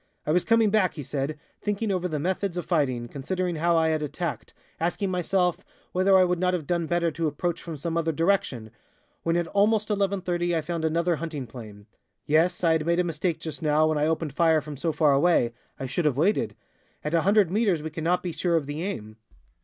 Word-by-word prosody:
"I - - 0
was 180 +2 +3
coming 225 -2 +3
back," 205 -4 +2
he 150 - -5
said, 140 +3 -3 0.2
"thinking 210 +1 -1
over 180 -1 0
the 155 -3 -3
methods 185 +3 -2
of 175 - -3
fighting, 130 -8 0
considering 175 +7 -3
how 170 +1 +2
I 160 0 +3
had 155 -1 0
attacked, 155 +2 -4 0.3
asking 180 +4 -1
myself 180 0 0 0.3
whether 190 +1 +4
I 185 - +6
would 180 -1 +1
not 180 0 +2
have 165 -5 -4
done 170 +1 -1
better 170 0 +1
to 160 +2 -1
approach 165 +3 -2
from 165 -3 -6
some 165 +4 -3
other 165 -1 +1
direction, 160 - 0 0.5
when 165 +1 +1
at 175 - 0
almost 210 +1 +2
11.30 185 -4 0
I - - 0
found 165 +1 -3
another 170 +1 +1
hunting 155 -4 -5
plane. 110 -4 -11 0.4
Yes, 165 +5 +2
I 165 - +4
had 160 -1 +1
made 170 +1 +2
a - - +3
mistake 170 0 -2
just 160 - -7
now, 155 0 +3
when 155 -1 0
I 150 - +2
opened 160 -2 -1
fire 160 0 +4
from 150 0 -8
so 160 +4 -1
far 150 -2 +3
away 140 -5 +3 0.3
I 135 - -3
should 155 +6 -2
have 140 -4 +2
waited. 185 +8 +1 0.5
At 150 - -3
100 190 +2 +3
meters 195 -7 +1
we 160 - -5
cannot 165 +3 0
be 180 - -2
sure 170 +2 0
of 160 -3 +1
the 145 +3 -5
aim. 110 - -5
170 Hz, 215 wpm, -26 LUFS, 150-180 Hz, 0.5 s, I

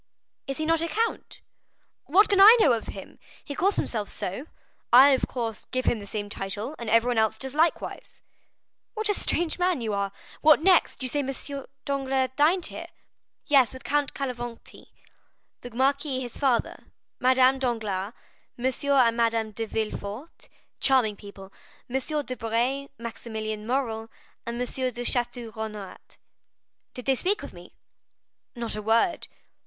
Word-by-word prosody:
"Is 275 - -3
he 310 - -2
not 325 0 +2
a 335 - 0
count?" 450 +6 -2 0.6
"What 385 +8 +5
can 395 -1 +4
I 435 +4 +10
know 285 - +5
of 225 - -3
him? - - -9 0.3
He 285 - -5
calls 390 +7 +1
himself 215 -3 -2
so. 225 - -5 0.4
I, 260 +4 +9
of 265 -2 +2
course, 230 -4 -4
give 255 0 -3
him 230 - +2
the 200 - -10
same 205 -1 -4
title, 205 +6 -4
and 235 -2 -4
everyone 230 +1 +3
else 220 -1 +2
does 265 -1 -6
likewise." 330 +10 -1 0.7
"What 435 -1 -1
a - - +4
strange 345 -3 0
man 355 -4 +2
you 220 -3 -2
are! 200 -1 -1 0.3
What 310 0 +7
next? 365 -7 +3
You - - -1
say 290 +3 -1
M. 275 -2 -2 0.6
Danglars 270 -2 0
dined 325 +5 +3
here?" - - -5 0.6
"Yes, 270 -5 +4
with 260 - -10
Count 290 -1 0
Cavalcanti, 240 -3 -6 0.7
the 245 - -8
marquis 270 +3 0
his 245 -2 -6
father, 260 -5 0 0.3
Madame 260 +1 +4
Danglars, 220 -5 -2 0.4
M. 245 - -5
and 260 -2 +3
Madame 230 -2 +1
de 225 +2 -4
Villefort,—charming 220 +2 -2
people,—M. 240 +9 -6
Debray, 250 +3 -1
Maximilian 220 -2 -5
Morrel, 230 -4 -1 0.4
and 235 0 -3
M. 250 - 0
de 250 -1 -3
Château 240 -2 -2
Renaud." 215 -3 -6 1.0
"Did 250 - -7
they 270 - +3
speak 390 - 0
of - - -8
me?" - - -14 0.8
"Not 235 -3 -3
a 215 - -4
word." 225 - +1
250 Hz, 150 wpm, -26 LUFS, 225-280 Hz, 1.0 s, I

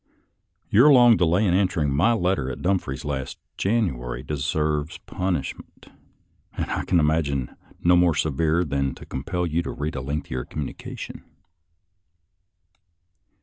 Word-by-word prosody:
YoTJE 125 +8 +7
long 120 -2 +7
delay 90 +3 +2
in 90 - +2
answering 90 -6 +1
my 85 +12 +3
letter 95 - +1
written 65 -1 -4
at - - -11
Dumfries 90 -8 -1
last 70 -3 -4 0.2
January 65 - -1
deserves 75 +1 -1
punishment, 90 -1 -4 0.7
and - - -2
I - - -2
can 90 - +3
imagine 75 -5 0 0.3
none 90 0 +5
more 85 -3 +3
severe 80 +2 +1
than 70 -4 -1
to - - -12
com 65 - -5
pel 90 +3 -2
you 85 0 0
to - - -5
read 75 +1 -4
a 65 - -3
lengthier 65 -2 -3
communication. 75 +1 -7
80 Hz, 140 wpm, -24 LUFS, 70-90 Hz, 0.7 s, YoTJE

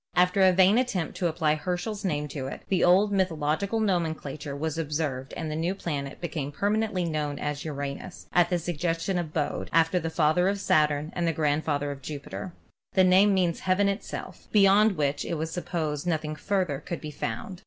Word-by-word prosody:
After 180 +2 +3
a 190 -1 +7
vain 190 +5 +5
attempt 200 -10 -1
to 180 - +1
apply 160 -2 +1
Herschel's 180 +7 -3
name 150 -6 -1
to 135 -3 -5
it, - - -7
the 190 - +2
old 190 +4 +5
mythological 185 +2 0
nomenclature 160 -8 -2
was 160 +2 -3
observed 145 -4 -2
and 160 -2 -3
the - - -3
new 170 +4 -1
planet 140 -7 -4
became 155 -5 -4
permanently 205 +1 0
known 150 -3 -2
as 145 0 -3
Uranus, 145 +3 -6
at 175 -1 +4
the 180 - +1
sug 175 -1 -4
gestion 170 +3 0
of 165 -3 -4
Bode, 150 -2 -2
after 165 +2 +3
the 165 -1 -3
father 160 +3 +2
of 200 0 -1
Saturn 150 -3 +2
and 175 -1 0
the 165 - +1
grand 150 0 0
father 145 -1 -1
of 140 -1 -8
Jupiter. 150 +6 -6 0.4
The 190 - +5
name 190 +3 +6
means 175 -3 +1
Heaven 190 +2 +2
itself, 200 +2 -5
be 210 - +5
yond 200 +2 +5
which 145 -1 0
it - - -3
was 160 +1 -3
supposed 165 -3 -3
nothing 155 -2 -1
further 180 -4 -1
could 170 +3 -5
be 150 - -7
found. 150 +8 -5
165 Hz, 195 wpm, -27 LUFS, 150-185 Hz, 0.4 s, a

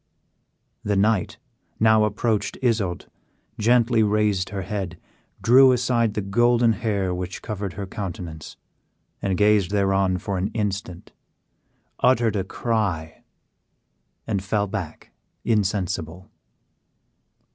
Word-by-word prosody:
The 105 - 0
knight 100 -1 +1 0.4
now 110 -1 +5
approached 105 0 -1
Isoude, 105 -8 0 0.5
gently 115 +1 +3
raised 105 -3 +1
her 100 -1 -4
head, 95 -3 -4 0.5
drew 130 +3 +7
aside 120 -3 +1
the 105 - -1
golden 120 +3 +3
hair 100 -4 -1
which 90 0 -5
covered 100 -4 -4
her 100 0 -5
countenance, 90 -6 -7 0.8
gazed 105 -2 +3
thereon 95 -2 +1
for 95 +1 -3
an 95 - 0
instant, 100 -4 -4 0.9
uttered 120 -4 +3
a 95 - 0
cry, 95 -7 -2 1.0
and 100 -4 -2
fell 100 +1 0
back 95 -6 -6 0.3
insensible. 95 -5 -1
105 Hz, 105 wpm, -23 LUFS, 95-110 Hz, 1.0 s, drew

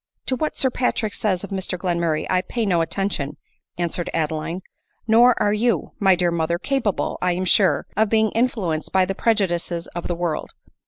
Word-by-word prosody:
" - - -54
To 260 - +2
what 305 +4 -2
Sir 260 - +1
Patrick 230 -4 -1
says 190 -4 0
of 200 - -7
Mr 190 -1 -3
Glenmurray 170 -3 0
I 185 0 +2
pay 230 +4 -2
no 175 -4 +2
attention," 165 -5 -2 0.4
answered 175 0 -2
Adeline; 160 +3 -2 0.2
" - - -44
nor 235 +2 +5
are 205 - +2
you, 230 +3 0
my 195 -2 +5
dear 175 -1 +1
mother, 170 0 0
capable, 240 -2 -1
I 180 0 +2
am 185 +2 -2
sure, 185 -4 +3
of 215 +1 +2
being 220 -1 +3
influenced 215 - -1
by 190 -1 +4
the 195 - -2
prejudices 175 -6 0
of 175 - -4
the 175 - -1
world. 170 -3 -3
185 Hz, 195 wpm, -22 LUFS, 170-220 Hz, 0.4 s, nor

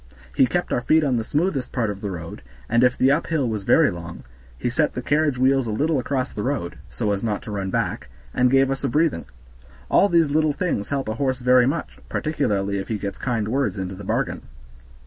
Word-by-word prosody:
He 130 - +4
kept 175 +5 -1
our 120 - +1
feet 155 +5 +3
on 130 -4 +1
the 115 - -1
smoothest 145 -1 -1
part 115 -5 0
of 100 0 -8
the 100 - -3
road, 85 -3 -7 0.3
and 115 +1 +3
if 125 0 +3
the 130 +1 +4
uphill 150 -2 0
was 110 -2 -2
very 165 -9 +5
long, 85 -1 -8 0.3
he 65 - -3
set 150 +5 +1
the 125 - -2
carriage 145 0 +1
wheels 130 0 +3
a - - -2
little 145 +6 +1
across 130 +1 -2
the 105 - -4
road, 125 -8 -3
so 65 - -2
as 100 -1 -2
not 105 -3 -2
to 110 - -7
run 100 -2 -3
back, - - -2 0.3
and 125 0 +3
gave 135 +1 +3
us 135 - -3
a 135 - +1
breathing. 150 - +1 0.7
All 200 - +5
these 165 -5 +3
little 155 0 +2
things 140 - -2
help 140 -3 -2
a 110 - -1
horse 130 +1 -1
very 125 0 +4
much, 155 +5 -3
particularly 100 -10 -1
if 95 - -5
he 110 - -2
gets 100 -1 -5
kind 115 -5 -1
words 130 -1 0
into 95 0 -4
the 100 +2 -9
bargain. - - -1
125 Hz, 225 wpm, -23 LUFS, 105-145 Hz, 0.7 s, very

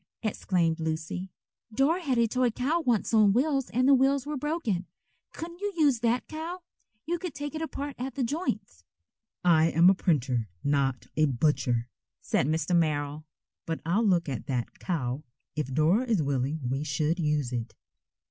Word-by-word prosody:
exclaimed 175 -6 0
Lucy, 160 +3 -3 0.4
"Dora 280 +10 +2
had 270 -7 0
a 235 -1 +4
toy 250 +2 +2
cow 265 +9 0
once 245 -8 0
on 210 -3 +6
wheels 270 +2 +1
and 255 +2 +2
the 280 - +7
wheels 270 +1 +3
were 300 0 -3
broken. 265 - -2 0.4
Couldn't 340 +1 -8
you 410 0 -1
use 285 -7 +4
that 235 +1 +1
cow? 335 +3 -6 0.4
You 345 +2 -1
could 355 -5 -5
take 290 +1 -5
it 315 - -4
apart 285 -3 -4
at 260 +2 -4
the 275 - 0
joints." 225 - -3 0.6
"I 160 -2 +5
am 170 +3 +6
a - - +4
printer, 130 - 0
not 140 -3 +1
a 155 - +4
butcher," 125 -3 +1 0.3
said 130 - 0
Mr. 160 +3 +1
Merrill, 150 -2 0 0.4
"but 165 -1 -2
I'll 180 +7 +2
look 180 -6 +2
at 130 -6 -4
that 125 -3 -3
cow, 135 -6 -2 0.3
if 150 -3 -2
Dora 160 - +3
is 220 -10 +1
willing 140 +2 -1
we 135 +3 -1
should 155 +4 0
use 150 -5 0
it." 115 -1 -4
185 Hz, 170 wpm, -28 LUFS, -, 0.6 s, the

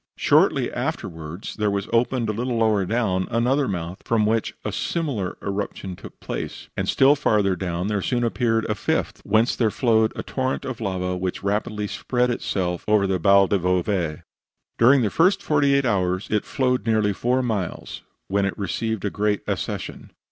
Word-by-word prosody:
Shortly - - +3
afterwards 80 +5 -5
there 105 -1 +1
was 100 0 -2
opened, 120 0 +1
a 105 - -1
little 120 +2 -2
lower 110 -4 +2
down, 100 -5 0
another 130 +4 +1
mouth, 90 -1 -4
from 110 -2 +1
which 110 +1 0
a - - -1
similar 135 - -2
eruption 100 -2 -4
took - - -12
place; - - -6
and - - -2
still 135 +2 +5
farther 105 -9 +2
down 90 0 -3
there 105 -1 -1
soon 120 +4 0
appeared 115 -1 +1
a 105 - 0
fifth, 105 - -2
whence 110 +3 +2
there 115 -3 +2
flowed 110 -1 +2
a - - -4
torrent 130 0 -2
of 130 -3 -5
lava 90 -3 -2
which 90 +1 -3
rapidly 105 +1 -1
spread 125 +4 0
itself 90 -6 -2
over 105 -2 +4
the 95 -1 0
Val 100 +3 +5
del 100 +1 +1
Bove. 90 -2 0 0.6
During 125 +2 +6
the 105 - 0
first 185 +4 +3
forty 145 -2 +3
eight 140 -1 +2
hours 95 -4 0
it 105 -1 +1
flowed 125 -3 0
nearly 110 -2 +2
four 125 +7 0
miles, 105 -7 -3 0.3
when 100 +1 +1
it 100 - -2
received 110 +1 -2
a 100 - -1
great 105 0 0
accession. - - -4
105 Hz, 175 wpm, -23 LUFS, 95-120 Hz, 0.6 s, During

